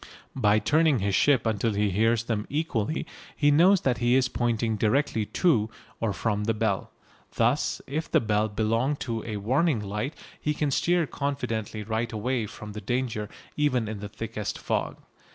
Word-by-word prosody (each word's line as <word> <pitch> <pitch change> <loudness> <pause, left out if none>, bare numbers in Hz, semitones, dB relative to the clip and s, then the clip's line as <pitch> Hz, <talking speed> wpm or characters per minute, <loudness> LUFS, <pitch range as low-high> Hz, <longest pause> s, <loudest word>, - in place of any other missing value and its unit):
By 105 -5 +3
turning 155 +4 +3
his 100 -2 0
ship 130 +3 +3
until 110 0 +1
he 105 0 +1
hears 115 +4 +2
them 110 -3 -2
equally 150 -3 -1 0.3
he 145 -1 +3
knows 180 +6 +5
that 125 -3 +1
he 120 +1 +3
is 130 -1 +3
pointing 115 -2 0
directly 110 0 +1
to 110 - +2 0.3
or 115 -2 0
from 105 +1 -1
the 115 0 +1
bell. 105 -3 -1 0.5
Thus - - +1
if 155 +4 -3
the - - +4
bell 105 -1 +1
belong 115 +6 0
to 115 -3 -3
a 110 -2 -4
warning 130 +6 +1
light 105 +8 -3 0.3
he 150 0 0
can 145 -2 0
steer 175 +4 +2
confidently 115 -8 -3
right 115 +2 -2
away 115 +1 -1
from 105 +1 -9
the 105 - -6
danger 120 -4 -2 0.3
even 130 -6 +1
in 110 -1 -5
the 105 0 -6
thickest 110 -1 -4
fog. - - -2
115 Hz, 170 wpm, -27 LUFS, 105-135 Hz, 0.5 s, knows